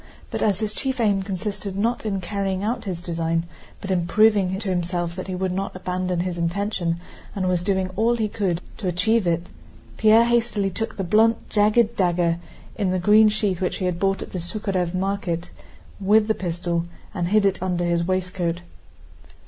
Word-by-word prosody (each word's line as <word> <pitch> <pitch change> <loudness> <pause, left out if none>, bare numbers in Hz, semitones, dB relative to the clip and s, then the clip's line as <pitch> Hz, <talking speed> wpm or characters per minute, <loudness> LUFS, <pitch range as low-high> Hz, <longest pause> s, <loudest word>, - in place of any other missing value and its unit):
But - - -3
as 205 -1 +1
his 215 -1 -1
chief 265 +2 -2
aim 205 -4 +2
consisted 195 0 -4
not 230 +2 0
in 195 -2 -1
carrying 195 0 -2
out 230 +3 -2
his 180 -3 -4
design, 165 -1 -1 0.4
but 195 - -4
in 175 -2 +1
proving 200 -1 +4
to 200 0 -4
himself 175 -1 -1
that 185 - -6
he 185 - -3
would 185 0 -1
not 195 +1 -3
abandon 180 -1 -2
his 175 -1 -3
intention 170 -1 -1 0.4
and 190 -2 -1
was 180 -2 +1
doing 190 0 0
all 230 +4 +2
he 220 -2 0
could 190 -5 -1 0.2
to 190 - -4
achieve 195 +4 +2
it, 170 0 +1 0.5
Pierre 220 +2 +6
hastily 235 -4 +1
took 225 +3 -4
the 195 - -1
blunt 220 +5 +3
jagged 215 +2 +3
dagger 175 -2 +2 0.4
in 200 -4 0
a 185 - +1
green 210 +4 +6
sheath 205 -4 -1
which 180 - 0
he 185 - -2
had 180 -1 -1
bought 195 0 +1
at - - -11
the 185 - -3
Súkharev 185 -1 -2
market 185 -3 -2 0.5
with 210 +2 +4
the 220 - +3
pistol, 170 -2 -2 0.3
and 175 -4 -1
hid 210 +2 +3
it 195 -2 +1
under 180 -1 0
his 170 0 +1
waistcoat. 180 -1 -1
190 Hz, 190 wpm, -23 LUFS, 175-210 Hz, 0.5 s, Pierre